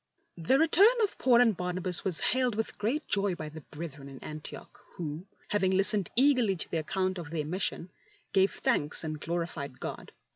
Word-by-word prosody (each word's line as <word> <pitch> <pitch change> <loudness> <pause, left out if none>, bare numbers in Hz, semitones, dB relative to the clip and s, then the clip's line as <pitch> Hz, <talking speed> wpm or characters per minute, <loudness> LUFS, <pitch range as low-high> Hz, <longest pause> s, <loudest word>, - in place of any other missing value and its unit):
The 170 +12 +3
return 360 - +5
of 410 - -1
Paul 245 -2 +4
and 225 -4 +3
Barnabas 180 0 -1
was 185 -4 0
hailed 250 -3 0
with 225 +1 -3
great 245 +9 -2
joy 200 -2 +1
by 155 -2 -7
the 155 +1 -10
brethren 145 -3 -9
in 135 - -11
Antioch, 155 0 -10 0.2
who, 160 +2 -6 0.2
having 200 -2 +1
listened 195 -1 +7
eagerly 250 -6 +3
to 170 - -4
the 165 - -1
account 185 +4 -2
of 165 -4 -8
their 155 -2 -3
mission, 180 +1 -3 0.4
gave 190 0 +3
thanks 150 +3 0
and 155 -1 -5
glorified 165 -5 -4
God. - - -7
185 Hz, 180 wpm, -29 LUFS, 160-220 Hz, 0.4 s, listened